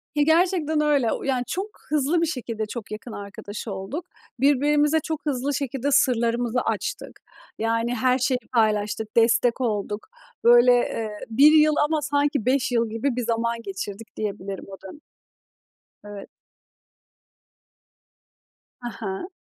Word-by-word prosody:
Ya, 295 - +3
gerçekten 320 -1 +2
öyle. 285 -6 +2
O - - -3
yani 260 -2 0
çok 385 +4 -3 0.2
hızlı 300 +3 +1
bir - - +3
şekilde 235 -8 -4
çok 215 -1 -8
yakın 215 +3 -7
arkadaş 205 +1 -8
olduk. 200 - -5 0.3
Birbirimize 290 +3 +3
çok 315 0 -5
hızlı 280 0 -1
şekilde 270 -1 -3
sırlarımızı 240 -2 +2
açtık. - - -4 0.4
Yani 230 +2 0
her 255 +2 +2
şeyi 255 0 +1 0.2
paylaştık, 215 -1 0
destek 230 +2 +3
olduk. 210 -3 -2 0.4
Böyle, 240 +1 +7
eee, 230 -2 0 0.2
1 280 +7 +6
yıl 305 -1 +5
ama 310 0 0
sanki 285 -3 0
5 260 0 +1
yıl 230 -2 +1
gibi 230 +4 -1
bir 250 - -1
zaman 230 0 -1
geçirdik 200 +2 -7
diyebilirim 200 -2 -5
o 195 - -9
dönem. 295 - -11 1.1
Evet. 205 -1 -9 2.5
Ha 240 - -5
ha. 215 - -5
245 Hz, 135 wpm, -24 LUFS, 220-290 Hz, 2.5 s, Böyle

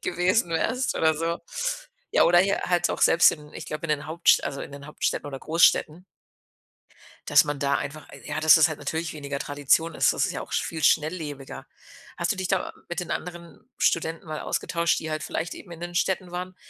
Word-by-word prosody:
gewesen 180 +2 +1
wärst 225 +11 0
oder 160 -1 +3
so. 165 +2 -2 0.7
Ja, - - +5
oder 175 +1 +5
hier 195 +2 +1
halt 175 -1 +1
auch - - -3
selbst 170 - +6
in 150 -1 -11
ich - - -8
glaube 155 +2 -5
in - - -4
den 145 -1 -1
Hauptst 165 +2 +3
also 140 - -4
in 140 - -9
den 140 0 -10
Hauptstädten 150 - -2
oder 135 -2 -6
Goßstädten 165 +1 +2 1.2
dass - - +6
man 145 -1 -3
da 140 0 +2
einfach, 145 +1 -6
äh, - - -13
ja 150 +1 -3
dass 155 -1 +7
es 160 +1 +5
halt 155 - -5
natürlich 160 +3 -3
weniger 140 -2 -5
Tradition 145 +4 +1
ist. - - +3
Das - - 0
ist - - -4
ja - - -5
auch - - -12
viel 160 -1 -2
schnelllebiger. 150 -3 -1 0.5
Hast 170 - 0
du 200 - -7
dich 190 -1 -3
da 190 -2 -1 0.2
mit 175 0 -3
den 175 - -7
anderen 170 0 -6 0.2
Studenten 165 0 0
mal 155 -1 -5
ausgetauscht, 170 -1 0
die 160 - -5
halt 155 0 -3
vielleicht 165 0 -3
eben 175 - -12
in 165 - -10
den 175 0 -6
Städten 180 +1 0
waren, 180 +1 -5
160 Hz, 210 wpm, -25 LUFS, 150-175 Hz, 1.2 s, dass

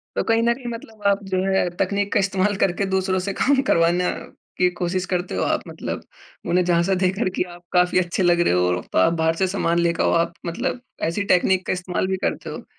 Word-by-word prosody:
तो - - 0
कहीं 225 0 +2
न 235 0 +3
कहीं 255 0 -13
मतलब 225 -2 -10
आप 200 0 +2
जो 185 - +1
है 190 -2 +1
तकनीक 200 +1 0
का - - +3
इस्तेमाल 195 +1 +1
करके 195 +1 +1
दूसरों 190 0 +1
से 195 +2 -3
काम 275 0 +3
करवाना 170 +2 +3 0.5
की 180 0 +3
कोशिश 180 +1 -1
करते 180 0 -2
हो - - 0
आप - - 0
मतलब? - - -5 0.5
उन्हें 180 +1 +3
झाँसा 175 +2 +2
देकर 185 +3 +1
की - - +1
आप 175 - -16
काफ़ी 180 0 +3
अच्छे 175 +1 -1
लग 175 0 +3
रहे 175 - +2
हो। 90 0 +1
तो - - 0
आप 95 - +4
बाहर 160 0 +1
से 190 +3 +1
सामान 170 -3 0
लेके 170 -1 +1
आओ - - +2
आप 170 0 0
मतलब 240 +9 -2 0.2
ऐसी 170 +5 0
टेक्निक 185 +1 +2
का - - +1
इस्तेमाल 180 0 -2
भी 190 0 -1
करते - - -3
हो? - - -8
185 Hz, 225 wpm, -22 LUFS, 175-195 Hz, 0.5 s, आप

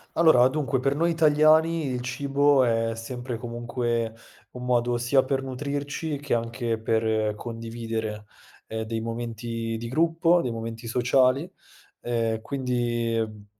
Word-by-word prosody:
Allora, 160 -7 +6
dunque 135 -3 -1
per 135 +1 +2
noi 165 +4 +1
italiani 160 +1 +4
il 125 -2 -2
cibo 140 +2 +2
è 115 -1 +1
sempre 120 +1 -5
comunque 120 -1 -2 0.4
un 125 0 -7
modo 120 -1 +2
sia 120 +3 +3
per 135 0 -1
nutrirci 145 +3 -4
che 145 -1 -2
anche 115 0 -1
per 110 -1 0
condividere, 115 -1 -5 0.4
ehm, 110 0 -3
dei 110 0 -3
momenti 115 0 -4
di 115 - -5
gruppo, 165 +5 +3
dei 125 - -2
momenti 115 0 -6
sociali, 130 +6 +2 0.5
ehm, 115 -2 -1
quindi, 120 -3 -1
ehm, 110 -2 -3
120 Hz, 130 wpm, -26 LUFS, 115-140 Hz, 0.5 s, Allora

